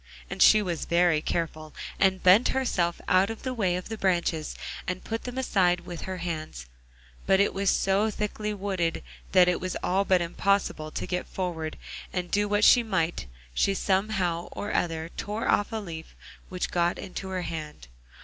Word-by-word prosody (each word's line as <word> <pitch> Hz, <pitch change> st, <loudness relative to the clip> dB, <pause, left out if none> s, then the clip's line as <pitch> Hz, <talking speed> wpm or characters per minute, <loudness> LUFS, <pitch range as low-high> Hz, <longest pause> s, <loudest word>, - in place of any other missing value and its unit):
And -, -, -4 dB
she 215 Hz, -1 st, +7 dB
was 175 Hz, -4 st, -3 dB
very 170 Hz, -2 st, +3 dB
careful, 155 Hz, -2 st, -3 dB, 0.2 s
and 190 Hz, -1 st, +2 dB
bent 190 Hz, +6 st, +7 dB
herself 175 Hz, -10 st, 0 dB
out 190 Hz, +1 st, +4 dB
of 225 Hz, -, -6 dB
the 260 Hz, -, -2 dB
way 190 Hz, -7 st, +1 dB
of 180 Hz, -, -5 dB
the 220 Hz, -1 st, -6 dB
branches, 170 Hz, -4 st, 0 dB, 0.3 s
and 185 Hz, 0 st, -3 dB
put 225 Hz, 0 st, -4 dB
them 250 Hz, 0 st, -5 dB
aside 185 Hz, -8 st, +2 dB
with 175 Hz, -2 st, -8 dB
her 185 Hz, -, -3 dB
hands; 155 Hz, -, -5 dB, 0.6 s
but 190 Hz, -, +4 dB
it 200 Hz, -, +3 dB
was 195 Hz, 0 st, +1 dB
so 195 Hz, +3 st, +2 dB
thickly 210 Hz, 0 st, -3 dB
wooded 190 Hz, -, -2 dB, 0.3 s
that 180 Hz, -1 st, +7 dB
it 180 Hz, -, +1 dB
was 185 Hz, -1 st, -3 dB
all 190 Hz, +2 st, +2 dB
but 185 Hz, -2 st, +3 dB
impossible 175 Hz, -2 st, 0 dB
to -, -, -4 dB
get 180 Hz, 0 st, -3 dB
forward, 165 Hz, -4 st, -4 dB, 0.3 s
and 180 Hz, -1 st, -3 dB
do 205 Hz, +1 st, +2 dB
what 205 Hz, 0 st, +1 dB
she 245 Hz, -, +8 dB
might, 175 Hz, -, -1 dB, 0.3 s
she 195 Hz, -, +2 dB
somehow 190 Hz, -3 st, 0 dB
or 205 Hz, -, -4 dB
other 165 Hz, -1 st, -1 dB
tore 210 Hz, +2 st, -3 dB
off 205 Hz, -, +2 dB
a -, -, -4 dB
leaf 170 Hz, -7 st, -7 dB, 0.3 s
which 180 Hz, -1 st, -3 dB
got 175 Hz, 0 st, +1 dB
into 190 Hz, 0 st, -6 dB
her 185 Hz, -1 st, -2 dB
hand. 155 Hz, -, -6 dB
185 Hz, 180 wpm, -27 LUFS, 170-200 Hz, 0.6 s, she